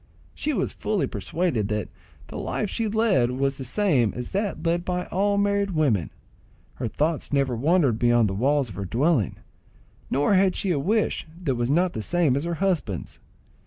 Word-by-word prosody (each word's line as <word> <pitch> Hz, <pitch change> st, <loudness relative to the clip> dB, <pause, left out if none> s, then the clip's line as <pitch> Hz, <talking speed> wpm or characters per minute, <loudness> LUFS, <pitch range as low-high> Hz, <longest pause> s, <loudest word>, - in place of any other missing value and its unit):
She 305 Hz, -, -2 dB
was 215 Hz, -10 st, -1 dB
fully 210 Hz, -4 st, -1 dB
persuaded 120 Hz, -, -1 dB
that 105 Hz, -1 st, -2 dB, 0.4 s
the -, -, -11 dB
life 210 Hz, -, -2 dB
she 225 Hz, -2 st, -1 dB
led 210 Hz, -, +2 dB
was 135 Hz, +2 st, -1 dB
the -, -, -4 dB
same 130 Hz, -, +1 dB
as 125 Hz, -1 st, -5 dB
that 200 Hz, -4 st, -2 dB
led 170 Hz, +1 st, +1 dB
by 180 Hz, 0 st, -2 dB
all 200 Hz, +2 st, +1 dB
married 200 Hz, -2 st, +1 dB
women. 120 Hz, -, +1 dB, 0.6 s
Her 120 Hz, -, -4 dB
thoughts 155 Hz, +6 st, -1 dB
never 135 Hz, -3 st, +1 dB
wandered 140 Hz, -3 st, +2 dB
beyond 120 Hz, -2 st, +4 dB
the 95 Hz, -, -2 dB
walls 135 Hz, +6 st, +1 dB
of -, -, -8 dB
her 100 Hz, -, -3 dB
dwelling, 125 Hz, -, +1 dB, 0.7 s
nor 145 Hz, +8 st, +2 dB
had 190 Hz, -1 st, +3 dB
she 195 Hz, -, -1 dB
a 150 Hz, -, +1 dB
wish 205 Hz, +4 st, 0 dB, 0.2 s
that 140 Hz, -6 st, +1 dB
was 120 Hz, 0 st, -1 dB
not 175 Hz, +5 st, +2 dB
the 110 Hz, -, -3 dB
same 165 Hz, 0 st, +2 dB
as 140 Hz, +4 st, -1 dB
her 170 Hz, 0 st, -2 dB
husband's. 165 Hz, -, -2 dB
150 Hz, 185 wpm, -25 LUFS, 120-185 Hz, 0.7 s, beyond